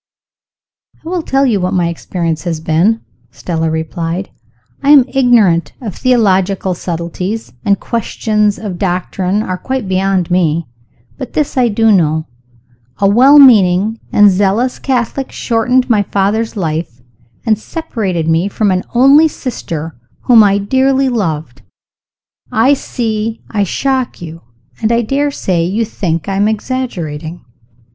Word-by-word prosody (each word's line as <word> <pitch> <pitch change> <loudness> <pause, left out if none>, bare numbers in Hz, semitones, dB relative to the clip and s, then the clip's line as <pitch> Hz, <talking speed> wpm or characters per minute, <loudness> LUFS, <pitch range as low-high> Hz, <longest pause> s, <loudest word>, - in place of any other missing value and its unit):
"I - - -5
will 360 -1 -1
tell 275 -2 +1
you 215 -7 +1
what 185 +1 -1
my 175 -2 +1
experience 170 -1 -3
has 165 -3 -2
been," 170 +8 +1 0.3
Stella 165 -2 -3
replied. 165 +3 -4 0.5
"I 280 - 0
am 285 -4 +7
ignorant 235 -11 +2
of 225 -8 -6
theological 195 -6 +1
subtleties, 175 - -5
and 200 0 +1
questions 215 -2 -1
of 195 -5 -6
doctrine 185 +2 -1
are 185 -3 -4
quite 260 -1 -3
beyond 190 -1 0
me. 170 -2 +1 0.5
But 260 - -7
this 300 -2 -1
I 255 -2 +3
do 225 0 +2
know. 160 -5 +2 0.7
A 200 - +2
well 255 +8 +6
meaning 215 -5 +5
and 205 -1 +5
zealous 205 +6 0
Catholic 265 +1 -2
shortened 250 +2 0
my 220 -4 +3
father's 205 +3 -1
life, 160 -8 -3 0.5
and 215 -2 +2
separated 200 - -3
me 165 +3 +1
from 205 0 0
an 185 0 0
only 275 +6 +6
sister 165 - -6 0.3
whom 235 -3 +6
I 200 -1 +3
dearly 265 +6 +1
loved. 160 - -3 0.9
I 235 +6 +3
see 225 -4 -3
I 205 -2 0
shock 260 +5 -2
you 165 -1 -9 0.4
and 220 - +1
I 235 0 +2
daresay 270 -9 -1
you 205 +7 -1
think 170 -7 -3
I 195 -1 -2
am 205 +1 +2
exaggerating?" 180 - -4
205 Hz, 135 wpm, -14 LUFS, 175-240 Hz, 0.9 s, am